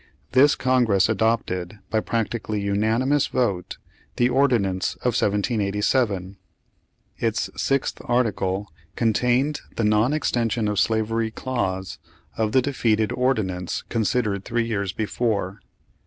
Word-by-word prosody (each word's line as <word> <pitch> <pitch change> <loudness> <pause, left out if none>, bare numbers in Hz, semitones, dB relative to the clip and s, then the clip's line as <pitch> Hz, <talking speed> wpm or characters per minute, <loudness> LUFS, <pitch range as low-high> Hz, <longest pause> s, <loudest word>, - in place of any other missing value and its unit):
This 140 +3 +5
Congress 120 -7 +2
adopted, 105 -4 0
by 110 - +2
practically 110 -1 -2
unanimous 110 +8 +1
vote, 100 -8 -1 0.4
the 120 0 +3
Ordinance 120 -9 +1
of 125 - +1
1787. 105 -1 0 0.8
Its - - -1
sixth 135 -1 -1
article 105 -5 0 0.2
contained 125 +5 +1
the 115 - -1
non 105 +4 +3
extension 120 -6 0
of 105 -1 0
slavery 110 0 +1
clause, 95 -7 -3 0.4
of 110 -1 0
the 130 +1 +3
defeated 110 -6 +1
ordinance 100 -9 -1
considered 110 -3 0
three 120 +2 -1
years 100 -4 -2
be 110 +3 -2
fore. 105 -4 -1
110 Hz, 110 wpm, -23 LUFS, 100-125 Hz, 0.8 s, This